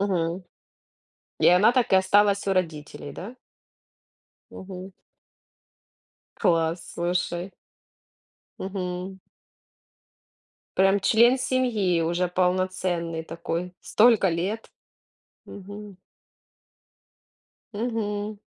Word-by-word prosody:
Мгм. 180 -2 -1 1.0
И - - +4
она 180 +6 +6
так 245 -4 +1
и - - +6
осталась 200 +1 +3
у 195 - +3
родителей, 155 -5 -3
да? 215 - -8 1.2
Мгм. 190 0 -9 1.4
Класс, 165 0 0
слушай. 175 +1 -2 1.1
Мгм. 185 0 -5 1.6
Прям 195 +1 +4
член 235 +6 +5
семьи 235 -9 +1
уже 175 +2 0
полноценный 180 -2 -1
такой, 170 +2 -4
столько 220 -3 +4
лет. 185 +7 -3 0.7
Мгм. 205 0 -10 1.8
Мгм. 210 -2 -3
190 Hz, 75 wpm, -25 LUFS, 175-205 Hz, 1.8 s, она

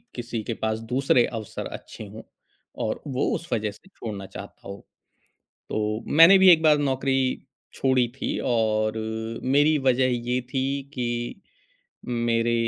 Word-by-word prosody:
किसी 120 -2 -4
के 115 - -3
पास 110 0 0
दूसरे 130 -2 +3
अवसर 110 -3 -6
अच्छे - - -11
हों - - -10 0.6
और - - -3
वो 135 -1 -1
उस 170 - -7
वज़ह 105 -2 -1
से 105 - -19
छोड़ना 105 - -7
चाहता - - -11
हो। 100 0 -7 0.9
तो 105 +1 -2
मैंने 165 +6 +8
भी 190 0 +7
एक 160 -2 +5
बार 155 -1 +6
नौकरी 135 -2 0 0.3
छोड़ी 130 -2 +2
थी - - -3
और 110 -2 +1 0.5
मेरी 145 +4 +3
वज़ह 130 -1 +2 0.2
ये 125 +1 +1
थी 130 -1 +1 0.3
कि 120 +6 -3 0.9
मेरे 115 0 +2
125 Hz, 140 wpm, -25 LUFS, 110-135 Hz, 0.9 s, मैंने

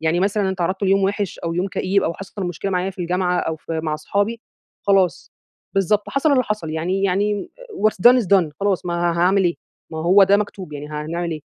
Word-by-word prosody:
يعني 160 +2 +1
مثلًا 200 +2 +1
أنا 190 - +1
اتعرضت 185 +2 -2
ليوم 195 0 +3
وحش 200 0 -2
أو 165 0 -3
يوم 180 +3 -1
كئيب، 195 +1 0
أو 170 - -1
حصل 195 +2 -8
مشكلة 175 +3 -4
معايا 185 +1 -1
في 190 - -17
الجامعة 180 0 0
أو 160 - -2
في 160 +1 -4
مع 155 -1 -1
اصحابي، 205 +9 -1 0.4
خلاص، 195 -4 +1 0.4
بالضبط، 200 +2 +1
حصل 285 +2 +1
اللي 260 -2 +4
حصل 210 -8 -3
يعني 175 +5 -1
يعني 200 +1 0 0.2
what 215 - +2 0.2
done 250 0 +4
is - - -5
done 180 -4 +3
خلاص 195 -3 0
ما 175 - -1
ها 170 0 0
هاعمل 190 +3 +3
إيه 170 -1 +2 0.4
ما 160 - -6
هو 180 +5 +5
ده 200 +1 +4
مكتوب، 200 -5 -5
يعني 145 0 -7
هنعمل 160 +3 -4
إيه؟ 155 -2 -4
185 Hz, 220 wpm, -21 LUFS, 170-200 Hz, 0.4 s, هو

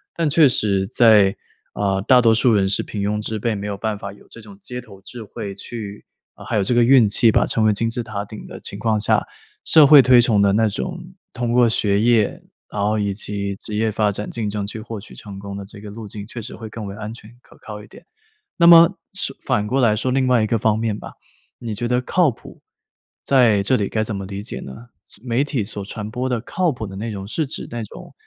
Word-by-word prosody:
但 165 -3 0
确 155 0 +5
实 100 -6 0
在 105 -5 +5 0.4
啊， 100 -1 0
大 125 +5 +4
多 115 -1 +4
数 115 +1 +3
人 95 -2 +2
是 95 - 0
平 105 - -6
庸 105 +1 -1
之 110 0 -4
辈， 115 0 -1
没 100 +1 -5
有 100 - -3
办 105 0 -3
法 100 -1 -7
有 100 - -19
这 - - -12
种 100 -2 -13
街 125 0 -6
头 105 -5 -14
智 120 +4 -10
慧 100 -2 -7
去 105 0 -8 0.3
啊 - - -13
还 - - -3
有 100 - +2
这 120 - 0
个 120 - +4
运 125 -5 +5
气 115 +2 +4
吧， - - +3
成 110 -2 0
为 105 - +4
金 115 +3 0
字 120 +1 -2
塔 105 -2 -5
顶 105 +1 -10
的 - - -9
情 - - -6
况 110 -2 +1
下， 105 - +1 0.4
社 155 -3 +7
会 145 0 +9
推 125 -1 +6
崇 110 -4 +2
的 100 -1 +3
那 110 +1 +2
种 65 - -6 0.2
通 120 -1 -2
过 120 0 +4
学 105 -2 +1
业， 115 -2 +2 0.3
然 100 - -4
后 105 +1 +1
以 100 -1 -1
及 100 0 -3
职 105 - -7
业 110 0 0
发 105 -1 0
展 105 +1 -5
竞 110 -3 -3
争 100 -1 -3
去 110 +2 -7
获 115 0 -7
取 105 - -14
成 100 -2 -10
功 100 0 -7
的 100 - -7
这 100 0 -11
个 105 - -9
路 110 +1 -9
径， 100 0 -8
确 115 +2 -8
实 - - -8
会 110 -2 -9
更 110 -1 -7
为 100 - -7
安 110 +1 -7
全 115 +1 -15
可 - - -21
靠 105 -1 -9
一 - - -15
点。 - - -16 0.5
那 170 - +4
么， 170 -1 +8 0.2
是 - - -4
反 105 0 0
过 135 +3 0
来 110 -3 +4
说 120 +4 -2
另 135 0 +1
外 125 -3 +3
一 - - 0
个 115 - +1
方 110 0 +1
面 110 -2 -2
吧， - - -10 0.5
你 115 -3 -5
觉 120 +3 -3
得 125 +1 +1
靠 170 +4 +2
谱， - - -15 0.6
在 120 -7 +4
这 130 +6 +2
里 100 -2 -1
该 110 -1 -1
怎 110 -1 -4
么 95 - -5
理 100 +1 -6
解 - - -6
呢？ 90 - -11
所 105 - -14
媒 125 +3 +1
体 140 -6 -2
所 100 0 -6
传 105 0 -7
播 125 +2 -3
的 120 -3 -1
靠 175 +5 -1
谱 110 -5 -6
的 95 - -9
内 110 +2 -4
容， 95 -1 -6
是 155 +7 -2
指 - - -6
那 120 -1 -4
种 105 - -12
110 Hz, 275 characters per minute, -20 LUFS, 100-120 Hz, 0.6 s, 会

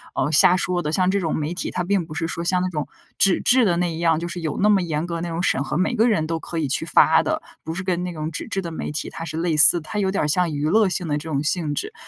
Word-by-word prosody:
呃， - - -1
瞎 180 +5 +6
说 180 -1 -2
的， 150 - -3
像 185 +2 +1
这 200 0 0
种 160 - -2
媒 155 +2 -3
体， 175 - -4
它 180 - -3
并 195 -3 0
不 155 - -11
是 165 +1 -3
说 170 +1 -5
像 180 +1 0
那 185 - -1
种 150 -4 -4 0.3
纸 195 - +4
质 255 0 +4
的 175 -5 +1
那 175 -1 -1
一 - - -7
样， 165 -2 +1
就 170 - -5
是 175 0 -6
有 155 -3 -4
那 210 - +3
么 205 -3 +3
严 160 -2 -3
格 170 -1 -5
的 165 - -4
那 175 - -4
种 165 +1 -4
审 140 -6 0
核， - - -4
每 185 +7 0
个 230 +2 +2
人 160 -8 0
都 165 0 -2
可 170 - -7
以 155 - -1
去 140 +4 -2
发 160 -1 +4
的， - - -2 0.2
不 160 - -5
是 190 +2 -5
跟 180 -1 -2
那 180 - -4
种 155 0 -5
纸 - - -5
质 195 -3 -3
的 170 - -6
媒 160 - -5
体， 150 - -4
它 165 - -7
是 160 0 -6
类 170 -1 -1
似， 170 +3 +10
它 210 +7 -5
有 190 -1 0
点 195 - -1
儿 - - -1
像 170 +2 +1
娱 145 0 -2
乐 215 +1 +3
性 180 -2 -2
的 145 - -1
这 160 - -9
种 140 -2 -2
性 155 -2 -2
质。 430 - -4
170 Hz, 355 characters per minute, -21 LUFS, 155-185 Hz, 0.3 s, 似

